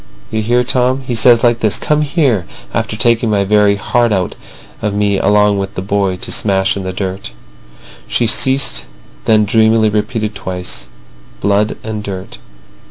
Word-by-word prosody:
You 110 0 -1
hear, 120 +3 +2
Tom? 130 +1 +1
He 125 - -3
says 115 0 +5
like 120 -1 +3
this: 110 -2 +1
'Come 150 0 0
here,' 140 - +1 0.3
after 110 - -2
taking 115 0 +2
my 100 -2 +2
very 105 0 +3
heart 120 +3 0
out 95 -3 0 0.5
of 105 -2 -2
me 100 -1 +1
along 105 -1 +3
with 100 0 -4
the - - -3
boy 100 -1 0
to - - -7
smash 95 -2 +1
in 100 - -4
the 95 0 -4
dirt." 95 -6 -5 0.7
She 120 - 0
ceased, 115 - +2 0.4
then 110 -1 +4
dreamily 110 0 +3
repeated 110 0 -2
twice: 90 -10 -5 0.5
"Blood 100 +2 +1
and 110 -1 -4
dirt. 95 -2 -7
105 Hz, 165 wpm, -15 LUFS, 100-115 Hz, 0.7 s, says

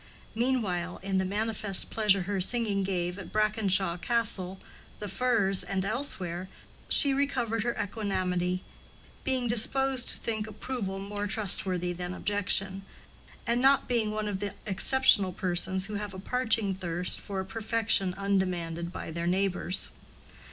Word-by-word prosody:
Meanwhile, 215 -8 -1
in 190 -1 0
the 190 - 0
manifest 205 0 0
pleasure 205 -4 +2
her 195 +1 -2
singing 210 -1 +1
gave 180 -1 -2
at 195 - -9
Brackenshaw 200 -4 +1
Castle, 195 -6 +1 0.4
the 210 - -5
Firs, 205 -4 +1
and 190 +1 -2
elsewhere, 185 -8 -2 0.4
she 280 -2 +5
recovered 255 -5 0
her 240 +2 -2
equanimity, 185 -4 -1 0.6
being 260 -2 0
disposed 255 +3 +2
to - - 0
think 220 -2 -3
approval 215 -2 -4
more 205 +1 -4
trustworthy 185 -3 +1
than 180 +1 -5
objection, 195 -1 0 0.6
and 235 +1 +1
not 270 +1 +4
being 235 -3 +1
one 215 0 -3
of 200 -2 -3
the 205 -1 -4
exceptional 205 -2 +6
persons 185 +1 -1
who 215 - -6
have 205 -1 -5
a - - -7
parching 225 -2 0
thirst 180 -1 -1
for 195 -2 -5
a 190 - -3
perfection 220 -3 0
undemanded 180 -4 -1
by - - -6
their 170 +1 -3
neighbors. 185 0 +1
200 Hz, 140 wpm, -29 LUFS, 185-225 Hz, 0.6 s, exceptional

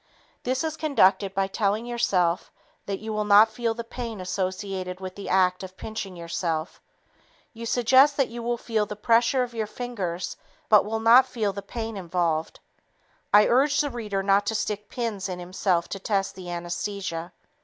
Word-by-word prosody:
This 255 +3 -1
is 320 0 -3
conducted 200 -10 +3
by 195 0 +2
telling 205 +3 -1
yourself 195 -8 0 0.4
that 200 -1 -2
you 220 +1 -5
will 215 0 0
not 210 +2 +6
feel 230 0 -1
the 235 - -5
pain 230 -2 -6
associated 185 0 -3
with 185 -1 -6
the 200 - -7
act 185 -1 +3
of 185 -1 -9
pinching 215 -4 -6
yourself. 170 -1 -3 0.7
You 230 0 -7
suggest 260 +4 +5
that 275 -3 +2
you 235 +1 -7
will 240 +1 -1
feel 220 -3 -1
the 210 - -6
pressure 235 +4 +3
of 245 -1 -6
your 220 -2 -2
fingers 200 -8 -4 0.3
but 210 -2 +6
will 220 +1 -2
not 240 +4 +7
feel 215 -6 -1
the 200 - -5
pain 225 +1 -5
involved. 170 -3 -1 0.7
_I 210 +1 +7
urge 280 +4 +3
the 290 -1 +1
reader 210 -5 -3
not 200 +1 +3
to 220 - 0
stick 210 -1 -3
pins 215 -6 -3
in 180 - -4
himself 180 -1 -1
to 195 - -5
test 195 -1 -1
the 185 -2 -9
anesthesia. 175 0 -4
205 Hz, 175 wpm, -25 LUFS, 185-235 Hz, 0.7 s, not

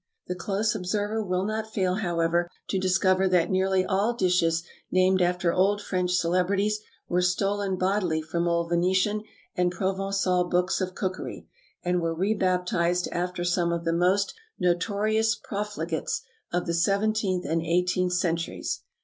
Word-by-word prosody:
The 180 - -3
close 200 +4 -1
observer 210 +2 -1
will 185 -1 -1
not 220 +1 -3
fail, 185 -3 0
however, 175 -3 0 0.2
to 190 - 0
discover 185 +1 +3
that 180 -1 +2
nearly 190 0 +2
all 205 +5 +1
dishes 175 -4 +2 0.3
named 185 0 +3
after 175 -1 +1
old 200 +3 +3
French 180 -3 -1
celebrities 190 +5 +1 0.3
were 180 +1 +1
stolen 195 +1 0
bodily 185 -3 +1
from 170 +2 -1
old 170 0 0
Venetian 185 +5 +2 0.3
and 180 0 +2
Provençal 190 -1 0
books 180 +1 +1
of 185 0 -3
cookery, 185 -1 -4 0.4
and 180 0 +1
were 165 0 -1
re 195 +6 +1
baptized 180 -2 +1
after 180 0 -2
some 175 -1 +1
of 170 0 -2
the 165 - +1
most 185 +4 +2 0.2
notorious 210 +5 +1
profligates 200 -8 -3 0.3
of 175 0 0
the 170 - -1
seventeenth 200 +1 +1
and 165 0 0
eighteenth 180 +2 +1
centuries. 170 -2 -1
185 Hz, 145 wpm, -26 LUFS, 175-195 Hz, 0.4 s, discover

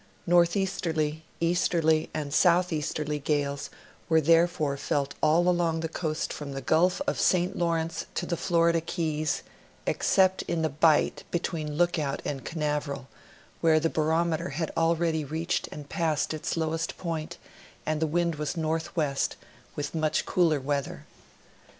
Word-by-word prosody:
Northeasterly, 170 -3 +1 0.2
easterly, 165 -2 +2
and 145 -2 -4
southeasterly 155 -4 +2
gales 140 -1 -1 0.4
were 160 -1 +5
therefore 165 -2 +3
felt 140 0 -1
all 165 +3 +4
along 170 -2 +2
the 165 - -1
coast 160 -1 -3
from 145 -2 -6
the 135 - -4
Gulf 180 - +2
of 285 - -1
St. 180 -1 +2
Lawrence 165 -1 -1
to 175 - -1
the 170 - -1
Florida 170 -1 +2
Keys, 155 -2 -2 0.4
excejJt 190 0 +3
in 165 -1 -1
the 160 - +2
bight 155 +2 +3
between 165 -3 -2
Look 175 -1 +2
out 140 -2 -2
and 135 -2 -3
Caiiaveral, 150 -4 -2 0.5
where 160 -2 +4
the 165 +1 0
barometer 160 +1 +1
had 155 +3 -3
already 165 -1 +1
reached 160 +4 -2
and 145 -1 -8
passed 160 +1 0
its 155 +2 -3
lowest 160 0 -2
point 165 -1 -4 0.5
and 155 0 -1
the 160 - +2
wind 170 0 0
was 150 +3 -3
northwest, 160 -3 -1 0.4
with 145 0 -4
much 155 -2 0
cooler 165 -5 +2
weather. 140 +1 -3
160 Hz, 140 wpm, -27 LUFS, 150-170 Hz, 0.5 s, were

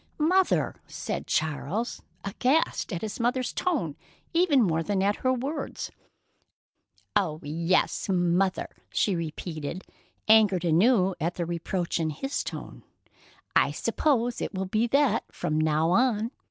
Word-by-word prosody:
"Mother!" 365 +5 +2
said - - -4
Charles, 160 - -1 0.2
aghast 255 +8 +1
at 175 0 -3
his 215 +2 -4
mother's 250 +2 0
tone 265 - -1 0.4
even 330 -7 +4
more 165 -4 +1
than 195 +2 0
at 205 +1 +2
her 255 - +1
words. 265 +5 -3 1.2
"Oh, 155 -5 +1
yes, 165 +7 0
'Mother'!" 180 +1 +1 0.2
she 200 - +1
repeated, 165 0 -5 0.4
angered 210 -5 +5
anew 190 +3 +4
at 170 +3 -1
the 175 - -2
reproach 170 +1 -2
in 160 -1 0
his 270 - -3
tone. - - -7 0.7
"I - - +5
suppose 245 -5 0
it - - -3
will 190 0 -1
be 215 +5 +1
that 270 -3 +3
from 155 +1 -1
now 155 +1 +2
on. 230 +1 +2
195 Hz, 130 wpm, -27 LUFS, 170-245 Hz, 1.2 s, angered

